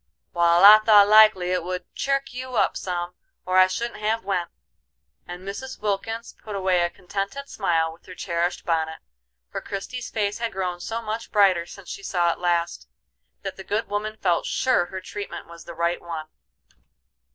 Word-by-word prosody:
"Wal, 170 +2 +5
I 210 +1 +11
thought 210 -2 +6
likely 215 -4 +6
it 180 -2 0
would 180 +1 -5
chirk 275 -1 -1
you 255 0 -6
up - - +2
some, 175 -1 -3 0.3
or 185 0 +3
I 185 - +7
shouldn't 230 +4 -4
have 220 0 -1
went," 180 -3 -1 0.8
and 175 +1 -8
Mrs. 215 +7 -7
Wilkins 215 +3 -3
put 210 -2 -6
away 185 -2 +2
a 175 - +1
contented 200 +10 -5
smile 165 -8 0
with 165 - -21
her 180 - -10
cherished 175 0 -2
bonnet, 160 -1 0 0.5
for - - -4
Christie's 235 +5 -6
face 210 -1 -1
had 230 -1 -2
grown 180 -2 -3
so 225 +5 -4
much 225 +1 -5
brighter 190 -5 +4
since 195 -1 -12
she - - -6
saw 175 -3 +1
it - - -13
last, 170 - -1 0.6
that 195 - -5
the 190 - -8
good 210 +4 -2
woman 215 +1 -3
felt 175 -5 +1
sure 255 -10 +2
her 190 +1 -6
treatment 200 +2 -7
was 170 0 -13
the 170 - -9
right 170 +1 0
one. 165 -2 -6
190 Hz, 180 wpm, -24 LUFS, 175-215 Hz, 0.8 s, I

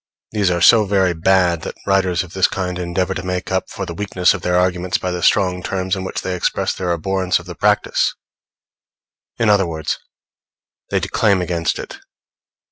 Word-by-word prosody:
These 105 -3 +1
are 85 -1 0
so 110 +3 +6
very 95 -2 +2
bad 85 0 +2
that - - -6
writers 95 -2 +2
of 90 -1 -13
this 95 -1 +3
kind 90 -1 -3
endeavor 90 +1 -1
to - - -4
make 90 0 -4
up 95 0 -1
for - - -5
the 85 - -6
weakness 95 -1 +1
of - - -5
their 90 0 +1
arguments 90 0 +1
by 90 - -3
the 90 0 -3
strong 90 -4 +2
terms 95 +1 -2
in 95 - -5
which 95 - -4
they 95 - -2
express 90 - -1
their 90 -2 -2
abhorrence 95 +2 0
of - - -9
the - - -7
practice; - - +1 1.2
in 115 - +1
other 100 -3 +4
words, 80 -2 -3 0.9
they - - +1
declaim 100 -3 +1
against 85 -2 -1
it. - - -8
90 Hz, 190 wpm, -19 LUFS, 90-95 Hz, 1.2 s, so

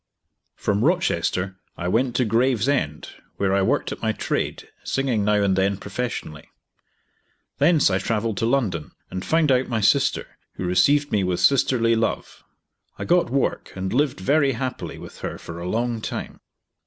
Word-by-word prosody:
From 100 +2 0
Rochester 95 - 0 0.2
I 85 - -3
went 120 +6 +1
to 125 - +2
Gravesend, 115 - +1 0.3
where 95 -1 +1
I 100 - +3
worked 95 - 0
at - - -6
my - - 0
trade, - - -3 0.2
singing 130 -6 0
now 105 +1 +2
and 95 -1 +2
then 95 +1 +1
professionally. 100 -9 -5 1.1
Thence 150 - +4
I 95 - +1
travelled 110 0 -1
to 115 - 0
London 105 - -1 0.2
and 95 0 -4
found 160 -3 +2
out 130 0 +2
my 115 -3 -1
sister, 135 +5 +1
who 95 - -5
received 145 +11 +3
me 100 -2 +2
with 90 -1 -1
sisterly 115 +1 +3
love. 115 0 -2 0.5
I - - -5
got 175 -4 +3
work 135 +2 -1
and 95 +1 -3
lived 135 -2 +1
very 140 +7 +2
happily 130 +2 -4
with - - -11
her - - -5
for 85 0 -9
a 85 +1 -4
long 115 +1 -1
time. - - -5
115 Hz, 165 wpm, -23 LUFS, 95-135 Hz, 1.1 s, Thence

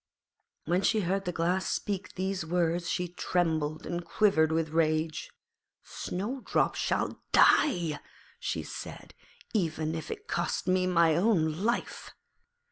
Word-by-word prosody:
When 175 +4 +1
she 215 +2 +2
heard 195 +2 -1
the 180 - -1
Glass 180 +3 0
speak 195 -2 -3
these 190 0 -2
words 170 +1 0
she 180 - -1
trembled 160 -4 -1
and 175 0 -3
quivered 165 -4 +3
with 160 0 0
rage. 155 0 0 0.5
'Snowdrop 230 +9 -2
shall - - -1
die,' 170 - +4 0.4
she - - -2
said, - - -8 0.4
'even 160 -6 0
if 160 -1 -5
it 420 +1 -7
cost - - -1
me 185 0 +2
my 170 -3 +4
own 170 -4 +2
life.' 235 +2 -2
175 Hz, 125 wpm, -29 LUFS, 160-190 Hz, 0.5 s, die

